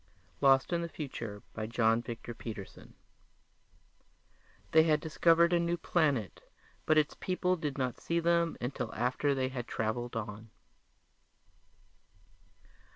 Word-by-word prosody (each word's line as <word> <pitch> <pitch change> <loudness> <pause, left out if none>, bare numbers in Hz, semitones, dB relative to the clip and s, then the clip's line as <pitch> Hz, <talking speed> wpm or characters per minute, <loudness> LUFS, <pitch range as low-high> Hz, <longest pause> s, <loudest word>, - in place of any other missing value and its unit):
_ - - -33
lost 135 +3 +4
in 170 - +1
the 170 - -4
future 115 -10 -6
by... 110 -1 -4
John 115 0 +2
Victor 120 0 -7
Peterson 110 -4 -9 1.8
They 160 - +7
had 155 -1 +3
discovered 165 +2 +3
a 175 - +4
new 170 0 0
planet 145 - 0 0.5
but 155 - +4
its 150 -1 +2
people 185 0 0
did 150 -5 -4
not 130 -2 -2
see 170 0 0
them 170 0 +2
until 125 +3 -3
after 130 +4 +1
they 130 -1 0
had 125 -2 -5
traveled 115 +2 -2
on. 110 0 -5
135 Hz, 130 wpm, -31 LUFS, 115-165 Hz, 1.8 s, They